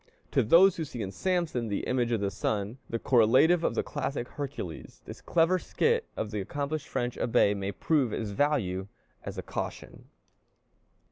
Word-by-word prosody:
To -, -, +3 dB
those 175 Hz, -, +6 dB
who 165 Hz, -, -2 dB
see 120 Hz, -7 st, -5 dB
in 95 Hz, -, -5 dB
Samson, 170 Hz, -, -1 dB
the 100 Hz, -, -2 dB
image 125 Hz, -2 st, 0 dB
of 115 Hz, -3 st, 0 dB
the 100 Hz, -1 st, 0 dB
sun, 105 Hz, +4 st, -2 dB
the 115 Hz, -, -1 dB
correlative 130 Hz, +10 st, +4 dB
of -, -, 0 dB
the -, -, +1 dB
classic 140 Hz, -4 st, -3 dB
Hercules, 140 Hz, -, -6 dB
this -, -, -9 dB
clever 175 Hz, +2 st, +2 dB
skit 465 Hz, -, 0 dB
of 105 Hz, -, -3 dB
the 105 Hz, -2 st, -2 dB
accomplished 145 Hz, +8 st, -3 dB
French 120 Hz, 0 st, -2 dB
Abbé 110 Hz, -4 st, +3 dB
may 100 Hz, 0 st, -3 dB
prove 130 Hz, -, +1 dB
of 110 Hz, -, -2 dB
value 100 Hz, -5 st, 0 dB, 0.4 s
as -, -, -6 dB
a -, -, -4 dB
caution. -, -, -6 dB
125 Hz, 175 wpm, -29 LUFS, 105-155 Hz, 0.4 s, those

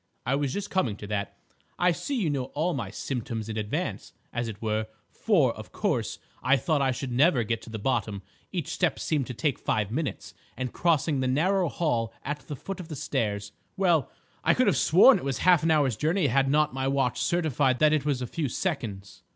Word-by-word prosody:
"I 125 Hz, -, +1 dB
was 140 Hz, -1 st, 0 dB
just 205 Hz, +6 st, -4 dB
coming 130 Hz, -, +1 dB
to 105 Hz, -, -9 dB
that. 100 Hz, -1 st, -3 dB, 0.4 s
I 180 Hz, 0 st, +4 dB
see 275 Hz, -, -3 dB
you 190 Hz, -, +1 dB
know 135 Hz, -3 st, -1 dB
all 165 Hz, +4 st, +1 dB
my 115 Hz, -8 st, -3 dB
'symptoms' 115 Hz, -2 st, -4 dB
in 110 Hz, -, -4 dB
advance, 105 Hz, -1 st, -3 dB, 0.2 s
as 120 Hz, 0 st, -2 dB
it 105 Hz, -2 st, -6 dB
were; 110 Hz, -1 st, -1 dB, 0.2 s
for, -, -, +2 dB
of -, -, -10 dB
course, -, -, -1 dB, 0.2 s
I 140 Hz, +2 st, +4 dB
thought 145 Hz, +3 st, +1 dB
I 135 Hz, -, +2 dB
should 130 Hz, 0 st, -3 dB
never 130 Hz, 0 st, +4 dB
get 115 Hz, +1 st, -2 dB
to -, -, -11 dB
the 110 Hz, -, -5 dB
bottom. 110 Hz, -4 st, -1 dB, 0.3 s
Each -, -, -3 dB
step -, -, 0 dB
seemed 145 Hz, -5 st, -1 dB
to 125 Hz, -, -6 dB
take 135 Hz, +2 st, 0 dB
five 105 Hz, -1 st, -1 dB
minutes, 150 Hz, +4 st, -3 dB, 0.2 s
and 130 Hz, -1 st, -3 dB
crossing 160 Hz, -4 st, +1 dB
the 130 Hz, -, 0 dB
narrow 175 Hz, +7 st, +2 dB
hall 120 Hz, -9 st, 0 dB
at 145 Hz, +1 st, -2 dB
the 145 Hz, -, -4 dB
foot 195 Hz, +8 st, -6 dB
of 180 Hz, -, -7 dB
the 160 Hz, -, -6 dB
stairs—well, 130 Hz, -, -1 dB, 0.3 s
I -, -, +4 dB
could -, -, +3 dB
have -, -, +3 dB
sworn 195 Hz, -, +6 dB
it -, -, -9 dB
was 135 Hz, -2 st, -1 dB
half 180 Hz, 0 st, +5 dB
an 165 Hz, -, +1 dB
hour's 145 Hz, -7 st, +3 dB
journey 160 Hz, -, +1 dB
had 135 Hz, +1 st, +2 dB
not 150 Hz, 0 st, +2 dB
my 135 Hz, 0 st, -1 dB
watch 135 Hz, -3 st, 0 dB
certified 145 Hz, -6 st, +1 dB
that 155 Hz, +2 st, +4 dB
it 155 Hz, -, +2 dB
was 140 Hz, -4 st, 0 dB
a -, -, -1 dB
few 145 Hz, +3 st, -3 dB
seconds. 115 Hz, -, -4 dB
135 Hz, 215 wpm, -27 LUFS, 115-155 Hz, 0.4 s, sworn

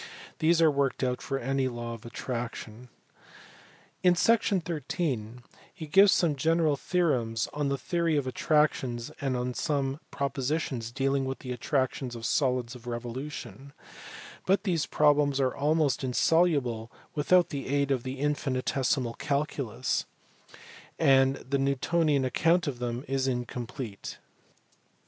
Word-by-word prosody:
These 165 Hz, +1 st, +4 dB
are 160 Hz, -, +6 dB
worked 140 Hz, -2 st, 0 dB
out 125 Hz, -1 st, -1 dB
for 135 Hz, -, -2 dB
any 135 Hz, +1 st, 0 dB
law 120 Hz, -1 st, -5 dB
of 115 Hz, 0 st, -9 dB
attraction. 120 Hz, -1 st, -6 dB, 1.1 s
In 180 Hz, -1 st, +5 dB
section 215 Hz, 0 st, +3 dB
thirteen 135 Hz, -, -3 dB, 0.3 s
he 160 Hz, -, -8 dB
gives 195 Hz, +6 st, +6 dB
some 165 Hz, -5 st, +2 dB
general 160 Hz, +1 st, +2 dB
theorems 130 Hz, -10 st, 0 dB
011 145 Hz, -1 st, -1 dB
the 140 Hz, -, 0 dB
theory 165 Hz, +2 st, 0 dB
of 140 Hz, -, 0 dB
attractions 130 Hz, -4 st, +1 dB
and 125 Hz, -2 st, -1 dB
some 140 Hz, -2 st, -1 dB
propositions 135 Hz, -3 st, -2 dB
dealing 135 Hz, +1 st, 0 dB
with 130 Hz, 0 st, -3 dB
the 125 Hz, -, -7 dB
attractions 130 Hz, 0 st, -1 dB
of 115 Hz, -1 st, -6 dB
solids 125 Hz, -3 st, +1 dB
of 120 Hz, -1 st, -12 dB
revolution, 125 Hz, +1 st, -6 dB, 0.7 s
but 195 Hz, +3 st, +3 dB
these 175 Hz, -7 st, 0 dB
problems 145 Hz, -2 st, +3 dB
are 130 Hz, -2 st, +1 dB
almost 145 Hz, -2 st, +1 dB
insoluble 130 Hz, -4 st, +2 dB, 0.2 s
without 175 Hz, +4 st, +3 dB
the 140 Hz, -2 st, -5 dB
aid 140 Hz, +1 st, +1 dB
of 130 Hz, -3 st, +1 dB
the 130 Hz, +2 st, -5 dB
infinitesimal 130 Hz, -3 st, 0 dB
calculus, 140 Hz, -4 st, -2 dB, 0.9 s
and 135 Hz, -3 st, +4 dB
the 135 Hz, +1 st, -2 dB
Newtonian 140 Hz, +1 st, +1 dB
account 165 Hz, +6 st, +2 dB
of 135 Hz, -5 st, -3 dB
them 120 Hz, +2 st, -3 dB
is 135 Hz, 0 st, 0 dB
in 125 Hz, -2 st, -1 dB
complete. 120 Hz, -3 st, -6 dB
135 Hz, 130 wpm, -28 LUFS, 125-150 Hz, 1.1 s, are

